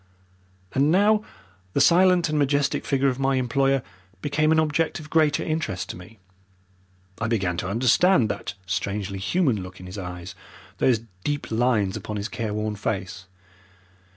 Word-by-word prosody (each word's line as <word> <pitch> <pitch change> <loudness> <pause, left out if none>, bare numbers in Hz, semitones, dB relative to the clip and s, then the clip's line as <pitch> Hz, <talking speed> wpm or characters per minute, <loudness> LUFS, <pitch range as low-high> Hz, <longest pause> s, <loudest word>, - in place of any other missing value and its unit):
And 140 +3 +3
now 210 +4 +4 0.5
the - - +1
silent 180 +3 +5
and 150 -1 0
majestic 140 0 +1
figure 140 -1 +2
of 130 0 -3
my 135 0 +2
employer 135 +1 +1 0.4
became 155 +1 +2
an 160 - +4
object 160 +2 0
of 150 -1 -12
greater 155 -2 +3
interest 155 - -3
to - - -5
me. 105 +6 -13 1.0
I 115 - -1
began 95 -6 0
to 90 - -3
understand 125 - +4
that 100 - -4
strangely 95 +2 -3
human 130 - +1
look 90 0 -10
in 90 - -10
his 90 +3 -7
eyes, 90 -1 -7 0.5
those 120 -4 +3 0.2
deep 145 -4 -3
lines 110 -4 +1
upon 105 - -5
his 100 +2 -4
care 115 -3 -3
worn 105 0 -2
face. 95 -2 -4
125 Hz, 155 wpm, -24 LUFS, 100-150 Hz, 1.0 s, silent